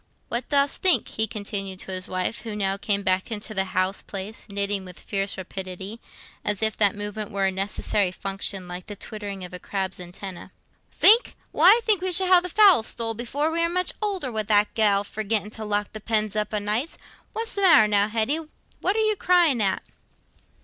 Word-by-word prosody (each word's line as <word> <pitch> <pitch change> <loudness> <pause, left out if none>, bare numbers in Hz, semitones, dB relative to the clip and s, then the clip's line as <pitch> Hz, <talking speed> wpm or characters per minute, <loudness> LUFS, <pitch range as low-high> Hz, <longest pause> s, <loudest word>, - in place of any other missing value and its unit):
What 235 +1 -3
dost 280 0 +2
think?" 370 -2 +4
he 220 0 0
continued 200 -2 -4
to - - -8
his 185 0 -4
wife, 185 +5 -3
who 225 -3 -6
now 195 -2 0
came 200 0 -1
back 185 +2 0
into 215 0 -5
the 190 -1 0
house 185 0 -1
place, 200 +3 -8
knitting 200 0 -1
with 180 -1 -11
fierce 195 -1 -3
rapidity, 190 +3 -7 0.4
as 210 +1 -1
if 220 -1 +2
that 205 -2 +4
movement 205 0 -5
were 195 -1 -1
a 190 - +1
necessary 195 0 -1
function, 195 0 -4
like 180 0 -8
the 205 - -7
twittering 200 -2 -7
of 180 - -12
a 180 - -6
crab's 190 -1 -4
antennæ. 180 +1 -9 0.4
"Think? 455 +4 +7 0.2
Why, - - +4
I 470 - +2
think 420 -5 +3
we 370 0 0
shall 375 +2 +6
have 365 -1 +6
the 360 - -5
fowl 395 - +6
stole 225 0 -3
before 270 +7 -2
we 330 - -2
are 335 - +2
much 365 +1 -1
older, 385 -11 -2
wi' 220 -1 -1
that 210 0 +2
gell 205 -3 +3
forgetting 210 0 -2
to 220 -1 -7
lock 205 0 -2
the 215 - -8
pens 215 -1 0
up 210 -1 -1
o' 215 - -1
nights. 215 +9 -2 0.4
What's 455 +2 -4
the 400 - -3
matter 325 - +6
now, 205 -1 +2
Hetty? 225 +8 0 0.4
What 390 - 0
are 440 0 +1
you 430 0 +2
crying 345 - +3
at?" 195 -2 0
210 Hz, 205 wpm, -24 LUFS, 195-250 Hz, 0.4 s, Think